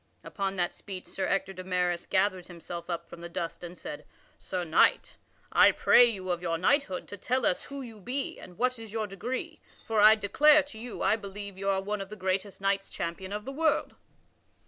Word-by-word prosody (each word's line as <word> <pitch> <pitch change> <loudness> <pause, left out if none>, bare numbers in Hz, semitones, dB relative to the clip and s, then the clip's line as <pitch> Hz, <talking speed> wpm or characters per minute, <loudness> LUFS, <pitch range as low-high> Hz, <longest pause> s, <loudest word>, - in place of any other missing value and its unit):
Upon 195 -1 -3
that 175 -2 0
speech 190 -2 -8
Sir 190 - -3
Ector 195 0 0
de 185 0 -7
Maris 180 -1 0
gathered 185 -2 +1
himself 170 0 -8
up 170 -1 -3
from 170 - -11
the 170 - -7
dust 170 0 -5
and 175 +1 -8
said: 150 - -7 0.4
"Sir 185 -1 -3
Knight, 160 -1 +3 0.4
I - - +7
pray 245 - +6
you 190 -6 -2
of 175 -1 -2
your 165 -2 -1
knighthood 190 - +1
to 205 - -7
tell 250 +5 0
us 180 - +1
who 280 -1 -7
you 225 -3 -10
be 255 +7 -3
and 180 -1 -12
what 250 -1 0
is 225 -2 -9
your 220 -1 -1
degree, 210 +6 -5 0.3
for 225 -1 0
I 215 +1 +9
declare 290 +9 +5
to 280 -6 -11
you, 240 0 -6
I 220 - +3
believe 200 -1 -7
you 195 +1 -2
are 190 -1 +2
one 205 +1 -2
of 195 - -7
the 215 - -7
greatest 190 +1 -2
knights 195 0 0
champion 185 +3 -5
of 210 +1 -4
the 270 - -4
world." 315 +3 +1
195 Hz, 215 wpm, -29 LUFS, 180-220 Hz, 0.4 s, I